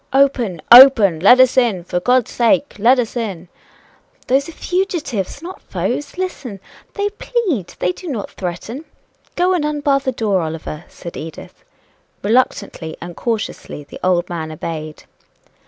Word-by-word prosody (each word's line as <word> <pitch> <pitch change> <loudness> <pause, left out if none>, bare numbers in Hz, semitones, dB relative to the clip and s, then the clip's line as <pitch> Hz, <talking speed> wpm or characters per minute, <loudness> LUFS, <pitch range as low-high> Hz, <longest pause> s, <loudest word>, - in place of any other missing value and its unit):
"Open! 250 - +2
open! 235 -9 +9
let 225 +9 +6
us 255 0 +5
in! 225 -8 +2
for 180 0 -2
God's 250 +5 +2
sake, 275 +4 +1
let 245 +5 +5
us 245 -2 -2
in!" 195 -7 -4 0.8
"Those 275 +4 +1
are - - -7
fugitives 325 - -3
not 365 +3 -8
foes 290 +4 -4
listen 280 - -5 0.4
they 405 0 -1
plead 405 - -3
they 180 - 0
do 360 - -10
not 240 -10 -4
threaten 200 - -6 0.5
go 360 +1 +2
and 350 -4 0
unbar 290 -2 +1
the 265 -1 -2
door, 210 -6 0
Oliver," 160 0 -6
said 170 - -10
Edith. 160 0 -9 0.6
Reluctantly 200 -7 0
and 175 0 -8
cautiously 220 -9 -4
the 145 - -12
old 180 -1 +1
man 160 -2 -5
obeyed. 155 -1 -6
235 Hz, 145 wpm, -18 LUFS, 175-280 Hz, 0.8 s, open